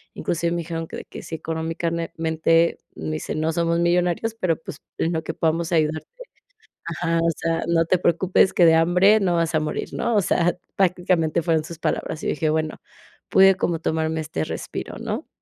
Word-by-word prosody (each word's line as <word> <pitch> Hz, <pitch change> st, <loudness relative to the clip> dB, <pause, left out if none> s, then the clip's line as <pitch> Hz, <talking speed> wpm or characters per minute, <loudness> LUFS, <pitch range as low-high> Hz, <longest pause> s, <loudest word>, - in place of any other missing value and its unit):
inclusive 170 Hz, 0 st, -1 dB
me 175 Hz, -, -1 dB
dijeron 165 Hz, -1 st, -4 dB
que -, -, -7 dB
de -, -, -8 dB
que -, -, -10 dB
si -, -, -10 dB
económicamente, 165 Hz, 0 st, 0 dB, 0.2 s
me 155 Hz, -, -5 dB
dicen: 155 Hz, 0 st, -3 dB
"No 160 Hz, +1 st, +1 dB
somos 170 Hz, 0 st, +1 dB
millonarios, 175 Hz, +5 st, +1 dB
pero 180 Hz, -7 st, 0 dB
pues -, -, -8 dB, 0.2 s
en 165 Hz, -, 0 dB
lo 160 Hz, -1 st, -2 dB
que 160 Hz, -, -4 dB
podamos 165 Hz, +1 st, 0 dB
ayudarte, 155 Hz, -1 st, +1 dB, 0.8 s
ajá, 165 Hz, 0 st, -1 dB
o 165 Hz, -, +2 dB
sea, 165 Hz, 0 st, -1 dB
no 165 Hz, -1 st, +3 dB
te 185 Hz, -, +2 dB
preocupes 180 Hz, +2 st, +3 dB
que 175 Hz, -, +5 dB
de 160 Hz, -, +6 dB
hambre 180 Hz, +6 st, +5 dB
no 180 Hz, -3 st, +1 dB
vas 165 Hz, -1 st, 0 dB
a 155 Hz, -, +3 dB
morir", 155 Hz, 0 st, -3 dB
¿no?, 235 Hz, -2 st, 0 dB
o 205 Hz, -, +4 dB
sea, 175 Hz, 0 st, +1 dB, 0.2 s
prácticamente 175 Hz, -3 st, +1 dB
fueron 160 Hz, -2 st, +1 dB
sus 165 Hz, -1 st, -9 dB
palabras, 160 Hz, -1 st, -2 dB
y -, -, -4 dB
yo -, -, +3 dB
dije: 155 Hz, +1 st, -1 dB
"Bueno, 155 Hz, 0 st, -1 dB, 0.5 s
pude 195 Hz, 0 st, +6 dB
como 170 Hz, -2 st, -1 dB
tomarme 160 Hz, 0 st, -1 dB
este 80 Hz, -, -3 dB
respiro", -, -, -6 dB
¿no? -, -, -4 dB
165 Hz, 195 wpm, -23 LUFS, 160-175 Hz, 0.8 s, de